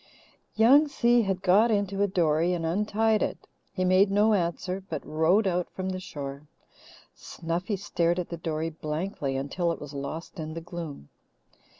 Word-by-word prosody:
Young 270 +8 +6
Si 240 -4 +3
had 195 -3 -2
got 200 +5 +5
into 200 -2 0
a 205 - +4
dory 170 -2 +2
and 170 -2 -2
untied 210 +5 +1
it. - - -3 0.3
He 185 -2 -1
made 185 +2 +4
no 210 +2 +3
answer, 180 0 -1
but 155 -3 -4
rowed 165 +7 +2
out 180 -2 0
from 185 0 -4
the 185 0 -3
shore. 140 -4 -7 0.7
Snuffy 175 +5 -4
stared 175 -3 0
at 180 - -3
the 170 - -5
dory 160 0 -3
blankly 155 -2 -3
until 170 +6 -1
it - - -5
was 145 -1 -9
lost 150 +6 -6
in 155 0 -5
the - - -3
gloom. 165 - -8
180 Hz, 170 wpm, -27 LUFS, 160-200 Hz, 0.7 s, Young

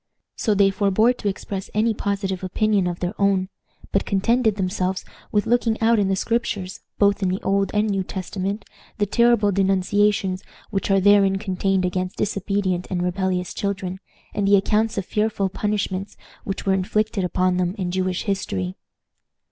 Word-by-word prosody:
So 215 - +1
they 195 0 +4
forbore 200 +4 +3
to 210 - -3
express 195 -1 -4
any 220 +2 +2
positive 195 -3 -2
opinion 200 0 +1
of 175 -1 -4
their 180 +2 -1
own, 195 -1 +2 0.4
but 195 - +2
contented 220 +2 +2
themselves 185 -1 -1 0.3
with 205 -1 +2
looking 230 -1 +1
out 230 0 +3
in 200 - +2
the 195 - +1
Scriptures, 205 -3 -2 0.2
both 200 0 +3
in 190 - +1
the 185 +2 -1
Old 195 0 +1
and 210 +1 +2
New 195 -2 0
Testament, 195 +2 -4 0.3
the 205 - +2
terrible 235 -1 +3
denunciations 195 0 +1 0.3
which 195 -1 -1
are 195 0 +4
therein 195 0 +5
contained 195 -1 0
against 185 +1 -2
disobedient 195 -3 -1
and 180 -2 -1
rebellious 180 0 -1
children, 190 -2 -3 0.3
and 200 -1 0
the 200 - +6
accounts 210 +3 +1
of 195 - -1
fearful 210 -2 0
punishments 200 -1 -2 0.3
which 195 - -4
were 195 - +3
inflicted 200 +2 0
upon 180 +1 +1
them 180 +1 0
in 180 -3 -2
Jewish 185 0 -1
history. 95 - -2
195 Hz, 165 wpm, -23 LUFS, 185-205 Hz, 0.4 s, the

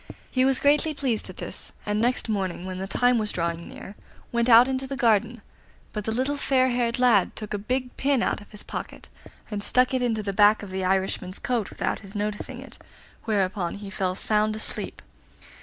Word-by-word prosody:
He 255 0 +3
was 265 -1 +3
greatly 295 +2 +3
pleased 255 -6 -1
at - - -10
this, - - -7
and 210 +1 0
next 245 +1 +1
morning, 190 -4 -2
when 185 0 -5
the 190 - -3
time 245 +3 +3
was 215 -1 0
drawing 170 0 -2
near, 195 - -9 0.4
went 235 +1 +1
out 235 +2 +9
into 265 0 -2
the 275 0 -4
garden; 230 -2 +2 0.5
but 210 -1 -4
the 220 - -1
little 260 +5 0
fair 260 -2 +3
haired 240 -1 0
lad 240 -7 +4
took 210 -1 -6
a 205 - -1
big 250 +4 -2
pin 275 -3 +2
out - - -1
of 205 - -15
his 210 - -10
pocket, - - -7 0.4
and 205 -1 -3
stuck 250 +3 +3
it 260 - +1
into 225 -3 0
the 200 -1 -2
back 210 +2 +5
of 200 - -8
the 190 0 -2
Irishman's 190 0 0
coat 235 -6 -1
without - - -2
his 200 0 -12
noticing 210 0 -3
it, - - -12 0.5
whereupon 190 -4 0
he 200 -1 -8
fell 185 -1 -1
sound 215 +2 +1
asleep. 220 - -4
215 Hz, 205 wpm, -25 LUFS, 200-250 Hz, 0.5 s, out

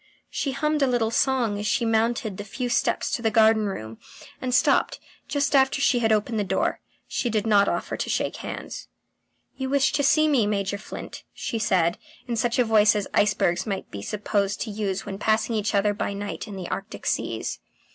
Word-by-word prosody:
She 275 - -2
hummed 300 +2 0
a 275 - +4
little 240 -3 +1
song 235 -5 +1
as 210 - -2
she 235 +3 +1
mounted 225 -2 0
the 205 - -5
few 245 +5 -4
steps 240 - 0
to - - -1
the 225 - +2
garden 220 -1 +4
room, 110 - -6 0.4
and 255 - -2
stopped 250 - +3 0.3
just 285 0 0
after 265 +1 +4
she 275 -3 +3
had 225 -2 +2
opened 215 +1 +1
the - - +1
door. 195 - 0 0.3
She 240 - -1
did 215 -2 0
not 205 -2 +4
offer - - -2
to - - -3
shake - - -1
hands. - - -7 0.7
"You 265 -1 -3
wish 275 0 +3
to 290 - +2
see 310 +2 +4
me, 260 -8 +3
Major 200 -1 -1
Flint?" - - -8
she 230 - -3
said, 175 -5 +1 0.3
in 240 - -1
such 235 +1 0
a 250 - +4
voice 215 -1 +5
as 205 -2 -1
icebergs 190 -2 +2
might 195 -2 -4
be 100 - -6
supposed 200 - -1
to 220 - -3
use 200 -2 -3
when 195 -1 -6
passing 220 +2 +1
each 215 0 0
other 205 +1 +3
by 205 - -3
night 205 +3 -5
in 205 - -7
the 185 -2 -5
Arctic 195 +2 -6
seas. - - -2
220 Hz, 205 wpm, -25 LUFS, 200-245 Hz, 0.7 s, voice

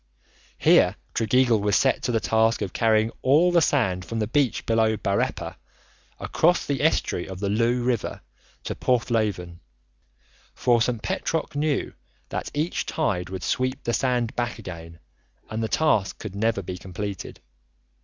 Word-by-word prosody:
Here - - +4 0.2
Tregeagle 115 0 +3
was 105 -1 +1
set 135 - +2
to - - -1
the 115 - +2
task 110 +3 +2
of 95 - -5
carrying 110 0 +2
all 155 +7 +4
the 170 -1 +4
sand 95 - +1
from 115 - -5
the 110 - 0
beach 135 +3 0
below 110 -1 +2
Bareppa 100 -1 -2 0.6
across 175 +2 +2
the 140 -1 -1
estuary 150 - +1
of 95 -1 -7
the 100 0 -1
Looe 120 +4 +1
river 120 -3 -1 0.4
to - - -3
Porthleven, 110 -8 -1 1.0
for 120 -2 +2
St. 115 -1 0
Petroc 160 -3 -2
knew 150 -1 0 0.4
that - - -4
each 155 +4 -1
tide 95 - -1
would 95 -2 -6
sweep 130 +6 -1
the 120 - -1
sand 120 -3 0
back 120 -1 -2
again 85 -6 -9 0.5
and 110 +1 -2
the 110 - 0
task 110 -9 +1
could 110 -4 -7
never 110 -1 0
be 90 +1 -6
completed. 95 0 -6
115 Hz, 155 wpm, -25 LUFS, 100-125 Hz, 1.0 s, Here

